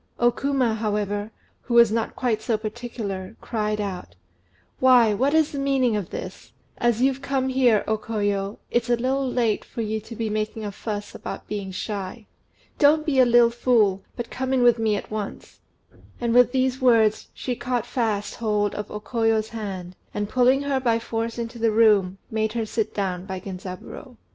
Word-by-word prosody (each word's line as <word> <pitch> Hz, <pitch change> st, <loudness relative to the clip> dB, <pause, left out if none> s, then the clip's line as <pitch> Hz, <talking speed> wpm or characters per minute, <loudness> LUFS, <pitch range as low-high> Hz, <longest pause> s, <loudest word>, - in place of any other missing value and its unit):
O 240 Hz, 0 st, +4 dB
Kuma, 270 Hz, -3 st, 0 dB
however, 210 Hz, -1 st, -2 dB, 0.3 s
who 240 Hz, -, -3 dB
was 235 Hz, -2 st, +7 dB
not 225 Hz, 0 st, -1 dB
quite 230 Hz, -4 st, 0 dB
so 220 Hz, 0 st, 0 dB
particular, 215 Hz, -3 st, -5 dB
cried 210 Hz, -2 st, -2 dB
out 195 Hz, -3 st, -5 dB, 0.6 s
"Why, 245 Hz, -4 st, +6 dB
what 270 Hz, +8 st, +1 dB
is 315 Hz, -2 st, +3 dB
the 280 Hz, -, -4 dB
meaning 270 Hz, -4 st, +2 dB
of 205 Hz, -3 st, -3 dB
this? -, -, -8 dB, 0.3 s
As 240 Hz, 0 st, +2 dB
you've 270 Hz, 0 st, +2 dB
come 270 Hz, -1 st, -1 dB
here, 250 Hz, -5 st, +3 dB
O 220 Hz, 0 st, 0 dB
Koyo, 205 Hz, -2 st, -2 dB
it's 240 Hz, 0 st, 0 dB
a 240 Hz, -, +4 dB
little 260 Hz, +2 st, 0 dB
late 230 Hz, -4 st, +1 dB
for 235 Hz, -, -6 dB
you 220 Hz, 0 st, -2 dB
to 225 Hz, +2 st, -10 dB
be 225 Hz, 0 st, -2 dB
making 215 Hz, +1 st, -3 dB
a 205 Hz, -, -3 dB
fuss 205 Hz, 0 st, -5 dB
about -, -, -7 dB
being 205 Hz, -2 st, -4 dB
shy. 200 Hz, +3 st, -5 dB, 0.5 s
Don't 305 Hz, +1 st, +5 dB
be 275 Hz, -4 st, +2 dB
a 255 Hz, -, +7 dB
little 240 Hz, 0 st, +5 dB
fool, 225 Hz, -5 st, +2 dB
but 240 Hz, -, -6 dB
come 260 Hz, +1 st, -2 dB
in 255 Hz, -2 st, +3 dB
with 240 Hz, -1 st, +5 dB
me 220 Hz, -2 st, +2 dB
at 200 Hz, -, -6 dB
once." 215 Hz, -2 st, -6 dB, 0.6 s
And 235 Hz, -1 st, 0 dB
with 245 Hz, -1 st, +6 dB
these 260 Hz, 0 st, 0 dB
words 225 Hz, -4 st, +4 dB
she 250 Hz, -, -3 dB
caught 245 Hz, -1 st, -2 dB
fast 220 Hz, -5 st, -1 dB
hold 210 Hz, -2 st, 0 dB
of 210 Hz, 0 st, -5 dB
O 210 Hz, -, -5 dB
Koyo's 225 Hz, -1 st, 0 dB
hand, 190 Hz, -5 st, -6 dB, 0.2 s
and, 205 Hz, 0 st, -1 dB
pulling 255 Hz, +4 st, +3 dB
her 280 Hz, -2 st, 0 dB
by 235 Hz, -3 st, +2 dB
force 230 Hz, 0 st, -3 dB
into 235 Hz, 0 st, -5 dB
the 225 Hz, 0 st, +3 dB
room, 210 Hz, -4 st, +4 dB
made 220 Hz, -1 st, 0 dB
her 230 Hz, -2 st, -1 dB
sit 220 Hz, 0 st, -2 dB
down 185 Hz, -2 st, -2 dB
by 190 Hz, -1 st, -4 dB
Genzaburô. 190 Hz, +6 st, -8 dB
225 Hz, 185 wpm, -24 LUFS, 210-245 Hz, 0.6 s, was